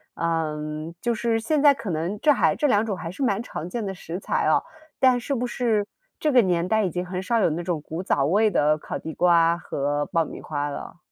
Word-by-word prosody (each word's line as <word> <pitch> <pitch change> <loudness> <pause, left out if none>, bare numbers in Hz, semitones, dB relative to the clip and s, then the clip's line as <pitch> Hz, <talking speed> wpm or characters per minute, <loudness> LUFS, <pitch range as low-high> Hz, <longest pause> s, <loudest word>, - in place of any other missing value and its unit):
嗯， 155 -1 -3
就 240 - 0
是 230 0 0
现 290 +6 0
在 290 -1 +7
可 225 - -7
能 170 +5 -2
这 300 - +4
还 280 - +3
这 295 - +1
两 215 -4 +3
种 210 -3 -2
还 165 -2 -6
是 190 - -9
蛮 215 -6 +1
常 175 -7 -6
见 230 +2 -3
的 195 - -3
食 175 0 -6
材 - - -1
哦， - - +3 0.4
但 255 -2 +4
是 275 +3 -2
不 250 0 -1
是 230 -4 0 0.3
这 305 - +1
个 255 -2 +6
年 175 -4 +1
代 220 +1 +2
已 - - 0
经 180 +2 -3
很 180 0 -4
少 230 +5 +1
有 190 - +3
那 160 +2 -2
种 170 -3 -2
古 160 +4 -5
早 140 -7 +1
味 205 +8 +3
的 150 -5 +2
烤 - - -5
地 160 - -7
瓜 170 -1 +4
和 145 -3 -2
爆 165 - +1
米 - - -9
花 145 -1 -3
了？ 145 - -7
180 Hz, 260 characters per minute, -24 LUFS, 160-225 Hz, 0.4 s, 在